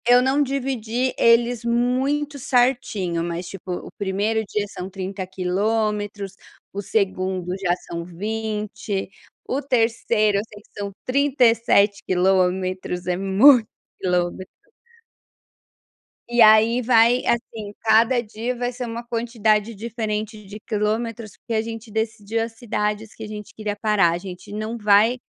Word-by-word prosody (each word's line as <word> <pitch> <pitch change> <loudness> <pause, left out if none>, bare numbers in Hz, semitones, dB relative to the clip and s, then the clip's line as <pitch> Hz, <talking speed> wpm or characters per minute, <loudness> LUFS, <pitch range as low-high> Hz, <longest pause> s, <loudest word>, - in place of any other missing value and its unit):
Eu 245 +1 +7
não 265 +3 +2
dividi 260 -3 -1
eles 235 0 +3
muito 260 +5 0
certinho, 245 -10 +1
mas 170 +1 -4
tipo 190 -1 -8
o 175 - -5
1º 205 +3 0
dia 210 -1 -1
são 185 -1 -7
30 190 0 -5
quilômetros, 205 +2 -1 0.4
o 200 - -3
2º 185 -3 -1
já 180 -2 +1
são 170 0 -4
20, 210 +1 -4 0.4
o 275 - -1
3º 225 -5 +1
eu - - 0
sei 205 -1 -13
que - - -29
são 200 0 -3
37 235 -7 +3
quilômetros, 185 -1 0
é 180 0 0
muito 215 +6 +5 0.3
quilometros. 180 0 -1 1.8
E 240 0 +3
aí, 220 +2 +6
vai 235 +1 +4
assim 225 -3 -2
cada 230 +2 +4
dia 230 +2 -4
vai 245 0 -2
ser 250 0 -5
uma 235 0 -5
quantidade 230 -2 0
diferente 215 -1 -4
de 205 +2 -9
quilômetros, 220 +1 -2
porque 235 - -6
a 220 - +2
gente 225 0 -7
decidiu 220 0 -2
as 230 0 -6
cidades 215 -2 -3
que 220 - -10
a - - -6
gente 210 0 -8
queria 215 -2 -4
parar, 205 -5 +3
a - - -1
gente 180 +1 -9
não 215 +2 -4
vai, 210 +3 +4
215 Hz, 140 wpm, -22 LUFS, 195-235 Hz, 1.8 s, Eu